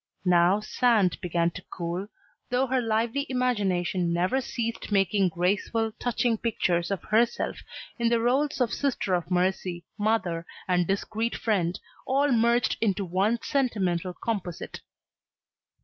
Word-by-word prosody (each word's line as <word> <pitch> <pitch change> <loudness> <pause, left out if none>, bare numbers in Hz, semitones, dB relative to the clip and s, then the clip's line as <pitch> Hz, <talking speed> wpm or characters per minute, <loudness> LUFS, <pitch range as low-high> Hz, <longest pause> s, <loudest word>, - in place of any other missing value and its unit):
Now 180 +3 +4
Sand 215 -4 +2
began 170 -1 +1
to 185 - -9
cool, 175 +3 -4 0.4
though 250 +2 +2
her 260 0 +1
lively 230 +5 0
imagination 195 -9 0
never 180 +10 +1
ceased 230 -3 -4
making 195 -1 +3
graceful, 205 +6 0
touching 240 -2 0
pictures 175 -7 0
of 195 -2 -3
herself 230 +2 +1 0.4
in 235 0 +2
the 235 0 +3
roles 265 +6 +1
of 240 -3 +1
sister 265 -9 -1
of 175 -1 -1
mercy, 180 -1 0
mother, 185 -6 0 0.2
and 180 -2 +2
discreet 215 +4 -1
friend, 185 -6 0 0.3
all 280 +2 +2
merged 235 0 +3
into 200 -3 +1
one 195 +6 0
sentimental 185 -10 0
composite. 195 -7 -4
205 Hz, 130 wpm, -27 LUFS, 180-235 Hz, 0.4 s, Now